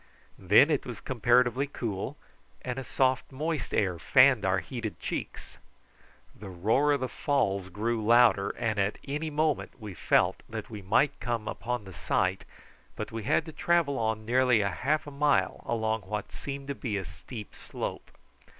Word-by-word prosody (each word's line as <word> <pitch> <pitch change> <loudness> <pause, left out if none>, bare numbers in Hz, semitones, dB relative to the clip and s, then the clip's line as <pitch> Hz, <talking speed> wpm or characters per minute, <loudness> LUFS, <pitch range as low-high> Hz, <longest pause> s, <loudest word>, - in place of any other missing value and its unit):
Then 105 - +5
it 145 - +1
was 120 -5 -7
comparatively 125 +2 +2
cool, 120 0 -4 0.5
and 125 0 -3
a - - -5
soft 130 +1 0
moist 155 +3 -3
air 90 -5 0
fanned 125 +8 +5
our 95 0 +2
heated 115 +2 -5
cheeks. - - -6 0.8
The 100 -1 -9
roar 110 +11 +2
of 140 - -1
the 130 - 0
falls 100 -10 0
grew 110 +4 -2
louder, 115 -3 +5
and 110 -2 -1
at 100 +2 0
any 150 +3 -2
moment 155 -3 -1
we 105 -3 -7
felt - - +2
that - - -6
we 105 -2 -7
might 135 +9 +2
come 115 -3 -3
upon 125 +1 -3
the 95 -1 -11
sight, 95 +1 0 0.5
but - - -5
we 115 0 -4
had 155 +4 +2
to 160 - -8
travel 155 -4 +1
on 110 -1 -1
nearly 125 -1 +3
half 140 +10 0
a 145 - -8
mile 145 +1 +1
along 110 -1 0
what 100 +2 -5
seemed 140 0 -7
to - - 0
be 115 -6 -3
a 95 - -4
steep 110 +1 -10
slope. - - -6
120 Hz, 170 wpm, -28 LUFS, 105-140 Hz, 0.8 s, Then